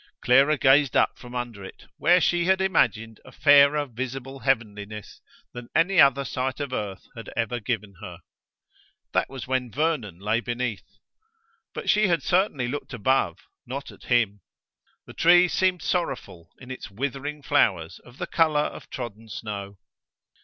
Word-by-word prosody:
Clara 135 Hz, +5 st, +4 dB
gazed 135 Hz, 0 st, +4 dB
up -, -, +1 dB
from 125 Hz, 0 st, -11 dB
under 120 Hz, -5 st, -5 dB
it, 95 Hz, -, -12 dB
where 175 Hz, +1 st, +4 dB
she 175 Hz, -1 st, +1 dB
had 190 Hz, +1 st, +3 dB
imagined 115 Hz, -, 0 dB
a -, -, -14 dB
fairer 145 Hz, 0 st, +5 dB
visible 130 Hz, +2 st, -6 dB
heavenliness 105 Hz, -6 st, -3 dB, 0.3 s
than 120 Hz, -1 st, -9 dB
any 180 Hz, +1 st, +4 dB
other 140 Hz, 0 st, +4 dB
sight 130 Hz, +1 st, -3 dB
of 140 Hz, -3 st, -4 dB
earth 100 Hz, -5 st, -4 dB
had 115 Hz, -, -9 dB
ever 120 Hz, +1 st, -1 dB
given 105 Hz, -2 st, -3 dB
her. 90 Hz, -4 st, -8 dB, 1.0 s
That -, -, +1 dB
was 135 Hz, -3 st, -7 dB
when 130 Hz, -1 st, -1 dB
Vernon 140 Hz, -, -1 dB
lay 105 Hz, +4 st, 0 dB
beneath. 120 Hz, -2 st, -5 dB, 0.8 s
But -, -, -6 dB
she 210 Hz, -1 st, +4 dB
had 170 Hz, -2 st, +1 dB
certainly 175 Hz, -9 st, +1 dB
looked 140 Hz, 0 st, -5 dB
above, 115 Hz, -7 st, +1 dB, 0.3 s
not 135 Hz, +3 st, -6 dB
at -, -, -16 dB
him. 110 Hz, -5 st, +1 dB, 0.6 s
The -, -, -12 dB
tree 175 Hz, +1 st, +5 dB
seemed 180 Hz, -1 st, 0 dB
sorrowful 110 Hz, -, -3 dB
in 130 Hz, 0 st, -11 dB
its 130 Hz, -, -8 dB
withering 140 Hz, +6 st, -5 dB
flowers 85 Hz, -9 st, +1 dB
of 120 Hz, +1 st, -18 dB
the -, -, -3 dB
colour 160 Hz, -3 st, +2 dB
of -, -, -6 dB
trodden 115 Hz, -3 st, -7 dB
snow. 100 Hz, -2 st, -6 dB
125 Hz, 155 wpm, -25 LUFS, 110-145 Hz, 1.0 s, fairer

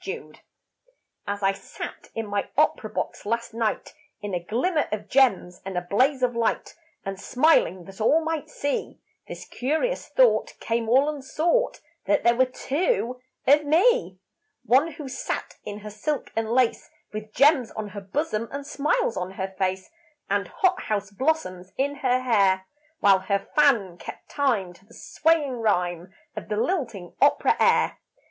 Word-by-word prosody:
TWO -, -, -6 dB, 0.9 s
As 200 Hz, 0 st, -3 dB
I 195 Hz, -, +4 dB
sat 195 Hz, -, -8 dB
in 225 Hz, -, -2 dB
my 205 Hz, -1 st, -2 dB
opera -, -, +2 dB
box -, -, -4 dB
last 230 Hz, +2 st, -2 dB
night 225 Hz, -2 st, -2 dB, 0.3 s
In 205 Hz, -2 st, -6 dB
a 175 Hz, -1 st, -2 dB
glimmer 295 Hz, -, 0 dB
of 210 Hz, -1 st, -4 dB
gems 205 Hz, -10 st, +2 dB
and 190 Hz, -1 st, -5 dB
a -, -, +1 dB
blaze 260 Hz, +7 st, +2 dB
of 245 Hz, -1 st, +1 dB
light, 230 Hz, -1 st, -1 dB, 0.3 s
And 195 Hz, 0 st, -4 dB
smiling 245 Hz, -, +3 dB
that 195 Hz, +2 st, -11 dB
all 290 Hz, +9 st, +4 dB
might 320 Hz, -2 st, -3 dB
see, 285 Hz, -1 st, -3 dB, 0.3 s
This -, -, -8 dB
curious 315 Hz, -, -1 dB
thought -, -, +3 dB
came 230 Hz, -1 st, -1 dB
all 265 Hz, +4 st, +5 dB
unsought 305 Hz, -, 0 dB, 0.2 s
That -, -, +2 dB
there 235 Hz, -, +5 dB
were 260 Hz, +1 st, +3 dB
two 260 Hz, -, -1 dB, 0.2 s
of 290 Hz, +2 st, +5 dB
me. 380 Hz, +12 st, +3 dB, 0.5 s
One 285 Hz, +7 st, +3 dB
who 290 Hz, -1 st, -8 dB
sat 260 Hz, -, -4 dB
in 210 Hz, 0 st, -6 dB
her 210 Hz, 0 st, -8 dB
silk 275 Hz, +7 st, -3 dB
and 225 Hz, 0 st, -1 dB
lace, 245 Hz, 0 st, +1 dB, 0.2 s
With 215 Hz, 0 st, -6 dB
gems 275 Hz, -3 st, +5 dB
on 215 Hz, -1 st, -6 dB
her 205 Hz, 0 st, -7 dB
bosom 225 Hz, +1 st, -2 dB
and 280 Hz, 0 st, -5 dB
smiles 285 Hz, -5 st, 0 dB
on 185 Hz, +1 st, -4 dB
her 190 Hz, 0 st, -4 dB
face, 190 Hz, -, -2 dB, 0.4 s
And -, -, +1 dB
hot 375 Hz, -3 st, +1 dB
house 205 Hz, -2 st, -2 dB
blossoms 200 Hz, -, -2 dB
in 285 Hz, +2 st, 0 dB
her 255 Hz, -2 st, +1 dB
hair, 195 Hz, -6 st, +3 dB, 0.4 s
While 195 Hz, -1 st, +6 dB
her 200 Hz, +1 st, -2 dB
fan 230 Hz, -, +3 dB
kept -, -, -10 dB
time 230 Hz, -11 st, 0 dB
to 180 Hz, -, -21 dB
the 225 Hz, +4 st, -18 dB
swaying 300 Hz, -5 st, +1 dB
rhyme 180 Hz, -4 st, 0 dB, 0.2 s
Of -, -, -7 dB
the 210 Hz, -, -1 dB
lilting 230 Hz, -, -2 dB
opera -, -, +4 dB
air. -, -, +3 dB
235 Hz, 165 wpm, -25 LUFS, 200-285 Hz, 0.9 s, While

